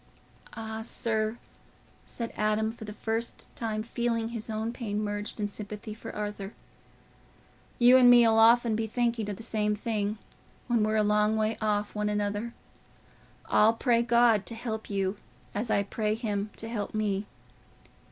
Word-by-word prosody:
"Ah, 220 0 -5
sir," 220 0 -1 0.7
said 230 -1 -3
Adam, 215 +1 +1
for 225 -1 -10
the 210 - -7
first 225 +2 -3
time 215 -2 -2
feeling 230 -1 -1
his 230 -1 -5
own 220 +1 -2
pain 210 -4 -3
merged 205 +1 -2
in 205 - 0
sympathy 210 +1 -7
for 215 - -8
Arthur, 205 -1 -5 1.2
"you 245 +1 +7
and 250 -1 +7
me'll 235 -2 +7
often 230 0 +5
be 220 0 -1
thinking 235 -2 -1
o' - - -2
the 215 - -8
same 210 -2 0
thing, 210 -1 -2 0.5
when 240 -3 +1
we're 215 0 +1
a 215 - +3
long 210 +1 +2
way 215 +1 +1
off 210 -1 0
one 210 0 -1
another. 210 +2 -2 0.9
I'll 220 +2 +4
pray 235 0 +2
God 235 -3 +3
to 230 - -5
help 225 -1 -5
you, 195 0 -1 0.4
as 220 +3 -2
I 200 - +2
pray 210 +1 -1
him 210 -3 -2
to 225 - -5
help 215 -2 -4
me." 205 -1 -1
220 Hz, 160 wpm, -28 LUFS, 210-230 Hz, 1.2 s, you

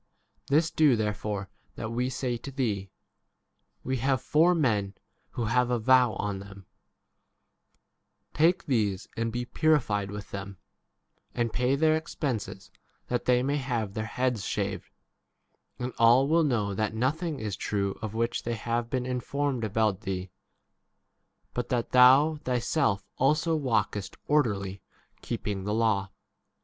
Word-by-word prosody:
This 155 +4 +2
do 155 -5 +4
therefore 105 -2 -2 0.3
that 110 - -5
we 125 +2 -1
say 130 -1 -2
to 120 - -7
thee: 110 -8 -2 0.9
We 130 0 -1
have 130 +2 +1
four 165 +4 +3
men 105 -10 +1 0.4
24 - - -28
who 120 - -1
have 125 +2 +2
a 125 - +2
vow 125 0 +4
on 100 -1 -3
them; 100 -1 -12 1.7
take 175 +5 +3
these 105 - 0
and 115 0 -1
be 120 +1 -3
purified 120 -10 +1
with 105 0 -8
them, 100 -1 -6 0.8
and 120 -2 -1
pay 125 +2 +2
their 155 +2 +3
expenses, 130 -10 -4 0.4
that 120 -1 -1
they 125 0 +3
may 140 +2 0
have 120 -7 -2
their 110 +1 -3
heads 125 -4 -1
shaved; - - -3 0.9
and 125 0 -4
all 120 +4 +6
will 165 +3 +3
n 155 - +2
know 105 -6 0
that 110 +2 -1
nothing 150 +6 -1
is 105 -3 -3
[true] 100 -2 -2
of 110 -1 -5
which 115 +1 0
they 120 0 -3
have 115 +1 -2
been 125 -1 -1
informed 130 +1 -2
about 110 -2 0
thee; 95 -3 -4 1.2
but 120 0 -3
that 120 -2 -1
thou 135 +5 +6
thyself 120 -4 0
also 155 +5 +2
walkest 110 -8 -1
orderly, 100 -10 0 0.4
25 - - -34
keeping 105 -4 -3
the 105 +1 -2
law. 110 -4 +1
120 Hz, 145 wpm, -28 LUFS, 105-135 Hz, 1.7 s, all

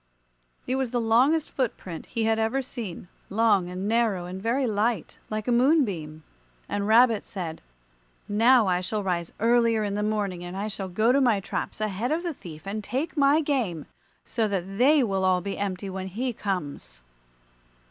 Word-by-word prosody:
It 255 - -1
was 265 -2 -1
the 240 - -1
longest 255 +8 +3
foot 255 -5 -1
print 170 -3 -8
he 230 -2 -2
had 225 0 +2
ever 235 +5 0
seen, 220 -9 -7 0.2
long 205 -4 +2
and 185 +2 -4
narrow 220 -5 +1
and 185 +2 -7
very 245 +5 +1
light, 215 -3 -1
like 215 +1 -3
a - - +2
moonbeam. 215 - +2 0.4
And 205 0 -2
Rabbit 230 -1 +5
said, 170 -5 -6 0.7
"Now 230 +3 +5
I 180 -1 +1
shall 205 +3 -2
rise 175 -3 -2
earlier 230 -1 +3
in 205 -1 -2
the 205 - -1
morning, 205 -4 -1
and 175 +2 -6
I 205 +2 -2
shall 195 -2 -5
go 215 +6 +2
to 275 +2 +3
my 235 -6 +3
traps 195 - -4
ahead 215 +4 -2
of 330 +3 0
the 345 -2 -2
thief 160 - -11
and 210 +2 -4
take 270 - -3
my 285 +1 +4
game, 240 - -1 0.4
so 225 -2 0
that 195 0 -3
they 285 +3 +5
will 195 -4 0
all 185 -1 +3
be 195 +2 -5
empty 195 -1 -3
when 190 0 -5
he 240 +6 -3
comes." 180 - -4
215 Hz, 185 wpm, -26 LUFS, 190-240 Hz, 0.7 s, Rabbit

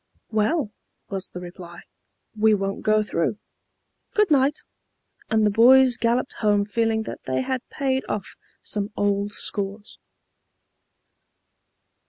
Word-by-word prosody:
"Well," 220 +3 +1 0.4
was 195 -1 -3
the 180 - -8
reply, 175 -1 -10 0.5
"we 215 0 +4
won't 195 0 -3
go 215 0 +3
through. 170 0 -1 0.8
Good 420 -5 +3
night!" 280 +1 +3 0.7
and 220 -1 +3
the 210 - +3
boys 250 +3 +6
galloped 240 +2 0
home 205 -2 +2
feeling 225 +1 0
that - - -7
they 130 0 0
had 260 - -2
paid 265 -1 -1
off 200 -2 -4 0.3
some 205 -1 -2
old 205 0 0
scores. 205 +1 -4
215 Hz, 120 wpm, -24 LUFS, 200-245 Hz, 0.8 s, boys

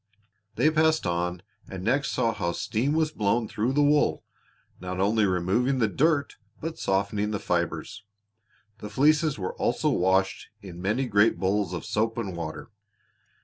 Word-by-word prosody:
They 155 - +3
passed 160 -2 +2
on 90 +1 -2 0.3
and 95 -1 -7
next 135 +6 +1
saw 115 -1 +1
how 85 -5 -2
steam 125 - -1
was 155 -1 +1
blown 110 -2 0
through 115 +6 -1
the 145 +1 +3
wool, 145 +1 +2 0.6
not 90 0 -5
only 105 +2 +2
removing 95 +9 +1
the 115 -3 +2
dirt 145 +5 +1 0.2
but 165 +1 -5
softening 100 +2 0
the 105 - -1
fibers. 90 +2 -3 0.8
The 105 - -7
fleeces 150 +6 +2
were 95 -2 -4
also - - 0
washed 95 +1 +1
in 90 -4 -10
many 110 +8 0
great 105 -1 +3
bowls 100 0 0
of 90 -3 -5
soap 115 +2 -1
and 100 -6 -3
water. 85 +6 -6
105 Hz, 155 wpm, -26 LUFS, 95-135 Hz, 0.8 s, They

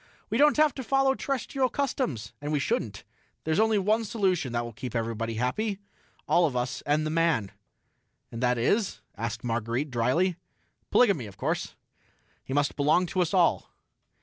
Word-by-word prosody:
"We 225 - +1
don't 295 0 +5
have 305 -3 +4
to 260 - -6
follow 270 +1 +3
terrestrial 270 -1 -1
customs, 225 - -2
and 145 +1 -3
we 150 - +2
shouldn't. 110 -6 -2 0.4
There's 160 +3 0
only 220 -1 +3
one 215 +3 +2
solution 190 - 0
that 120 0 -1
will 120 - -8
keep 125 +3 -7
everybody 115 0 -2
happy 195 - -1 0.5
all 175 -1 +4
of 135 - -5
us 125 0 -2
and 150 +1 +2
the 155 - -1
man." 160 -11 +1 0.8
"And 115 - -6
that 125 -1 +2
is...?" 200 - +1
asked 115 +1 -4
Marguerite 120 +4 -2
drily. 145 +10 +1 0.5
"Polygamy, 195 - +3
of 100 -1 -13
course. - - -2 0.7
He - - -9
must 145 +1 +1
belong 150 +5 +3
to 185 +1 -1
us 170 - 0
all." 180 -3 +2
155 Hz, 170 wpm, -27 LUFS, -, 0.8 s, don't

